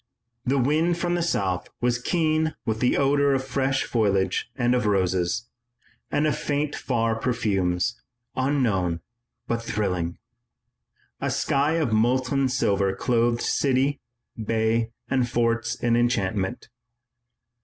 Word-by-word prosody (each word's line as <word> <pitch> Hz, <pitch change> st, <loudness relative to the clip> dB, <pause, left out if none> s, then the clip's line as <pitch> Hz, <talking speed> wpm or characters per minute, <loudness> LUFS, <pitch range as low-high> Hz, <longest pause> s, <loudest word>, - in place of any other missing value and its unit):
The 135 Hz, +2 st, +2 dB
wind 155 Hz, +6 st, +2 dB
from 175 Hz, 0 st, -1 dB
the 175 Hz, -, 0 dB
south 95 Hz, -, -1 dB
was 120 Hz, 0 st, 0 dB
keen 155 Hz, +1 st, +1 dB
with 110 Hz, -2 st, -1 dB
the 125 Hz, -, +2 dB
odor 140 Hz, 0 st, +3 dB
of 130 Hz, 0 st, -2 dB
fresh 135 Hz, 0 st, 0 dB
foliage 100 Hz, -2 st, 0 dB
and 120 Hz, -2 st, +2 dB
of 125 Hz, -4 st, +1 dB
roses, 95 Hz, +1 st, +1 dB, 0.6 s
and 145 Hz, -, +1 dB
of 150 Hz, -, +1 dB
faint 145 Hz, 0 st, -1 dB
far 115 Hz, -3 st, 0 dB
perfumes, 105 Hz, -4 st, 0 dB, 0.3 s
unknown 110 Hz, -, +1 dB, 0.5 s
but 115 Hz, 0 st, -1 dB
thrilling. 90 Hz, -7 st, -2 dB, 1.0 s
A -, -, -1 dB
sky 140 Hz, +3 st, +1 dB
of 155 Hz, -9 st, 0 dB
molten 130 Hz, +4 st, +2 dB
silver 100 Hz, -6 st, +1 dB
clothed 120 Hz, +2 st, +1 dB
city, 135 Hz, +1 st, +1 dB, 0.4 s
bay, 115 Hz, +1 st, +1 dB, 0.2 s
and 125 Hz, -1 st, +1 dB
forts 115 Hz, -1 st, 0 dB
in 120 Hz, -1 st, +1 dB
enchantment. 115 Hz, -3 st, 0 dB
120 Hz, 125 wpm, -25 LUFS, 105-135 Hz, 1.0 s, odor